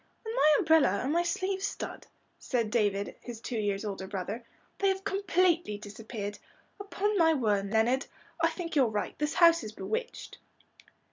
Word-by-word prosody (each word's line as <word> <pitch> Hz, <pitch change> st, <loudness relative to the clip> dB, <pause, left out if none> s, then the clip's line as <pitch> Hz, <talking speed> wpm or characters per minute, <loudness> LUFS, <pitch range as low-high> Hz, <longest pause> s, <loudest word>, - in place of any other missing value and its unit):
"And 445 Hz, -, -4 dB
my 305 Hz, -11 st, +5 dB
umbrella, 310 Hz, -12 st, +4 dB
and 275 Hz, +4 st, 0 dB
my 340 Hz, -, +3 dB
sleeve 375 Hz, +2 st, -1 dB
stud," 400 Hz, -, -5 dB, 0.3 s
said 230 Hz, -5 st, -1 dB
David, 205 Hz, -3 st, 0 dB
his 240 Hz, -2 st, -8 dB
two 230 Hz, 0 st, -4 dB
years 205 Hz, 0 st, -1 dB
older 195 Hz, -2 st, -4 dB
brother. 200 Hz, +4 st, -4 dB, 0.4 s
"They 395 Hz, -, +2 dB
have 385 Hz, 0 st, -1 dB
completely 365 Hz, -, +1 dB
disappeared. 205 Hz, 0 st, -7 dB, 0.4 s
Upon 405 Hz, 0 st, -1 dB
my 325 Hz, -1 st, +5 dB
word, 205 Hz, -6 st, +1 dB
Leonard, 230 Hz, +5 st, +2 dB, 0.3 s
I 330 Hz, -, +4 dB
think 335 Hz, 0 st, -5 dB
you're 270 Hz, -4 st, +5 dB
right, 210 Hz, -2 st, -3 dB
this 300 Hz, 0 st, -1 dB
house 335 Hz, -4 st, +6 dB
is 215 Hz, 0 st, -7 dB
bewitched." 455 Hz, -, -5 dB
260 Hz, 160 wpm, -30 LUFS, 210-345 Hz, 0.4 s, house